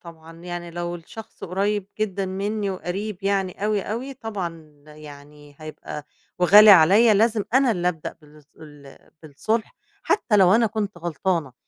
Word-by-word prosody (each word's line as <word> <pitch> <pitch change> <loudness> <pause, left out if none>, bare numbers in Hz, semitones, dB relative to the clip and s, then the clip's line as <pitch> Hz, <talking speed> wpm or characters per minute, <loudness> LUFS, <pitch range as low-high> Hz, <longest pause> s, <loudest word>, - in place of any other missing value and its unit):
طبعًا 165 -1 -14
يعني 175 -1 -7
لو 175 0 -5
الشخص 175 +6 -11
قريّب 195 +2 -2
جدًا 195 -2 -2
منّي 200 +2 -3
وقريب 190 +2 -5
يعني 195 0 -1
أوي، 210 -2 0
أوي، 250 +7 -5
طبعًا 170 - -7
يعني 145 -1 -14
هيبقى 155 -1 -9 0.3
وغالي 205 +4 +8
عليّا 200 +6 +6
لازم 220 0 +2
أنا 265 -2 +4
اللي 180 -4 0
أبدأ 160 -3 -6
بالص 150 -1 -19
ال 145 -3 -14 0.2
بالصُلح 215 +10 -3 0.3
حتّى 225 - +1
لو 190 -1 +5
أنا 230 0 +3
كنت 210 -4 -4
غلطانة، 170 -3 -2
185 Hz, 145 wpm, -23 LUFS, 160-210 Hz, 0.3 s, وغالي